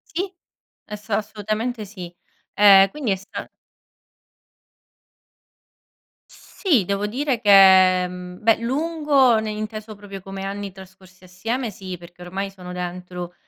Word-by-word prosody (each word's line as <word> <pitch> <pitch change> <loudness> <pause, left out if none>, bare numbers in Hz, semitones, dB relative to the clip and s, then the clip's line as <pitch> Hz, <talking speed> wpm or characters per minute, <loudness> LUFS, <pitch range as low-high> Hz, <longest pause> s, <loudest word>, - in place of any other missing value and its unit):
Sì 375 +2 -2 0.5
es 210 0 -9
assolutamente 215 +2 -2
sì. 185 -4 -9 0.4
Ehm 195 -1 +7
quindi 265 -7 -2
è - - +2
sta 195 +1 -8 2.8
Sì 300 - 0
devo 200 +2 -2
dire 260 +2 -1
che, 190 -3 +6
mhmm, 180 +2 -10
beh 225 0 +4
lungo 275 -1 +2
ne 220 0 -3
inteso 215 0 -6
proprio 200 -1 -10
come 195 +1 -7
anni 200 0 -5
trascorsi 190 -1 -16
assieme 225 +7 -4
sì, 185 -1 -7
perché 175 +1 -15
ormai 195 +2 -4
sono 180 -2 -10
dentro, 180 0 -6
200 Hz, 120 wpm, -22 LUFS, 185-220 Hz, 2.8 s, Ehm